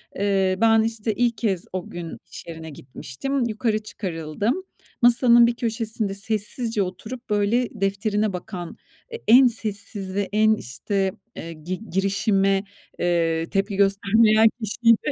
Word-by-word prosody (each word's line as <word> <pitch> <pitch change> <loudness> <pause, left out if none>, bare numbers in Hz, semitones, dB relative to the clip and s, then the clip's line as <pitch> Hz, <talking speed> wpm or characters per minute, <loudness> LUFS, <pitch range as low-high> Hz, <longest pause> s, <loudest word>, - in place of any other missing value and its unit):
Eee, 195 -2 +1
ben, 225 -1 +5
işte, 225 0 -1
ilk 240 -1 +1
kez 195 -7 -1
o 185 -2 -4
gün 175 -1 -7
iş - - -10
yerine 160 -1 -8
gitmiştim. 145 - -4
Yukarı 225 -1 0
çıkarıldım. 200 - -3 0.4
Masanın 240 0 +6
bir 235 - -1
köşesinde 225 -3 -2
sessizce 215 +2 -2
oturup, 220 +7 -8
böyle, 210 +4 +1
defterine 205 +1 0
bakan 175 -1 -7 0.4
e - - -3
en 250 +3 +8
sessizi, 205 -3 -3
en, 215 +1 +4
işte, 195 - -2 0.2
eee, 165 0 -7
gi 180 +7 -7
girişime, 195 0 +1 0.4
eee, 165 -2 +1
tepki 195 +1 0
göstermeyen 215 +3 +4
kişiydi. 230 +5 +2
205 Hz, 125 wpm, -23 LUFS, 190-225 Hz, 0.4 s, en